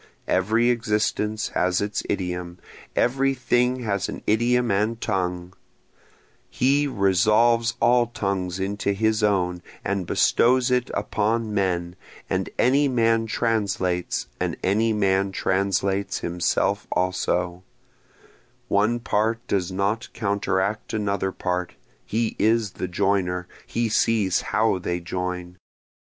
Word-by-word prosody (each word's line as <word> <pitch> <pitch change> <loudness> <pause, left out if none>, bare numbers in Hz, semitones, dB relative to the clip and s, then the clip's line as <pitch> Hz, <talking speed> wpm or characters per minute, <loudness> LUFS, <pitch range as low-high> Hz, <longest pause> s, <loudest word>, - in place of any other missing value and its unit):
Every 110 +6 +2
existence 105 -2 -1
has 90 0 +1
its 105 -1 -2
idiom, 90 -2 -3 0.4
every 135 +2 +2
thing 125 0 +1
has 100 -3 -1
an - - -7
idiom 120 +2 +2
and 105 +4 0
tongue, 90 -4 -2 1.0
He 140 +3 +2
resolves 115 +2 +3
all 120 0 +4
tongues 95 -5 -3
into 100 +1 -1
his 110 +2 +1
own 90 -4 +1 0.2
and 100 -3 -1
bestows 125 +1 +3
it 125 0 +1
upon 110 +2 -1
men, 90 -3 -1 0.4
and - - 0
any 140 +4 +3
man 115 -3 +2
translates, 100 -6 -1
and - - -2
any 110 +4 +2
man 100 -2 +1
translates 95 +1 0
himself 85 0 0
also, 90 -1 -1 1.1
One 110 +4 +2
part 115 0 0
does 95 -2 0
not 100 +5 -1
counteract 100 -1 -1
another 100 -2 -1
part, 90 -1 -3 0.3
he 115 +1 -1
is 110 -1 +2
the 90 - -4
joiner, 90 0 0 0.2
he 115 0 -1
sees 105 -3 +2
how 110 -3 +1
they 90 0 -2
join. 90 0 -4
100 Hz, 115 wpm, -24 LUFS, 95-115 Hz, 1.1 s, all